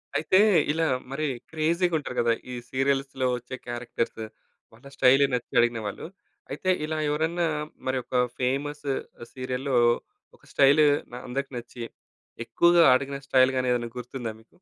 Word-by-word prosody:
అయితే 160 +5 +3 0.3
ఇలా 165 +1 0 0.3
మరి 155 +3 -2 0.3
క్రేజీ‌గా 165 +2 +1
ఉంటరు 145 -4 -6
కదా! 115 0 +3 0.2
ఈ - - -5 0.2
సీరియల్స్‌లో 135 -1 0
వచ్చే 125 +1 -8
క్యారెక్టర్సు. 120 -2 -4 0.5
వాళ్ళ 120 +5 -16
స్టైలు 135 +1 +5
నచ్చి 125 -1 -3
అడిగినవాళ్ళు. 115 -4 -1 0.5
అయితే 150 +7 -3 0.2
ఇలా 155 0 -3
ఎవరన్నా 165 +3 0 0.4
మరి 130 - 0
ఒక 125 - -1 0.2
ఫేమసు 140 +2 -1 0.4
సీరియల్‌లో 130 +1 -3 0.6
ఒక - - -35
స్టైలు 145 +2 +5 0.4
అందరికి 135 +3 -4
నచ్చి, 120 0 -8 0.6
ఎక్కువగా 170 0 +4
అడిగిన 140 +1 -2
స్టైల్ 130 -1 +4
గాని 130 0 0
ఏదైనా 120 -1 -3
గుర్తుందా 120 -2 -6
మీకు? 115 - -28
135 Hz, 130 wpm, -26 LUFS, 125-150 Hz, 0.6 s, స్టైలు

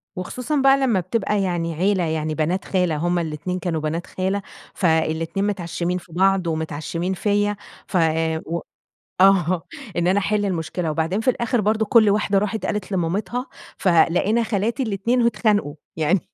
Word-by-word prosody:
وخصوصًا 250 +10 -3
بقى 270 0 +6
لمّا 255 -8 +2
بتبقى 200 +2 -1
يعني 175 -3 -1
عيلة 190 +2 +1
يعني 155 -1 -1
بنات 165 +5 -1
خالة 180 -4 +1
هُم 175 +3 0
الاتنين 165 +3 -3
كانوا 170 -4 -2
بنات 160 +3 -3
خالة، 190 +2 -2 0.3
فالاتنين 165 +2 0
متعشّمين 180 -2 -2
في 180 -1 -12
بعض 190 0 +2
ومتعشّمين 160 +3 -2
فيّا، 205 +2 +1 0.3
ف 185 - -1 0.5
و 170 +2 -2 0.6
آه، 185 -3 +4 0.3
إن 175 0 +1
أنا 190 +3 +3
احل 205 +1 0
المشكلة، 165 -2 -2
وبعدين 165 +6 -1
في 255 - +3
الآخر 240 -1 0
برضه 215 +1 +1
كلّ 220 -2 +5
واحدة 205 -1 +2
راحت 210 0 -2
قالت 210 -1 -3
لمامتها، 190 +8 -1 0.3
فلقينا 185 +5 +3
خالاتي 225 +3 -1
الاتنين 230 +2 0
واتخانقوا، 210 -9 +1 0.2
يعني 165 +4 +2
185 Hz, 150 wpm, -22 LUFS, 170-210 Hz, 0.6 s, بقى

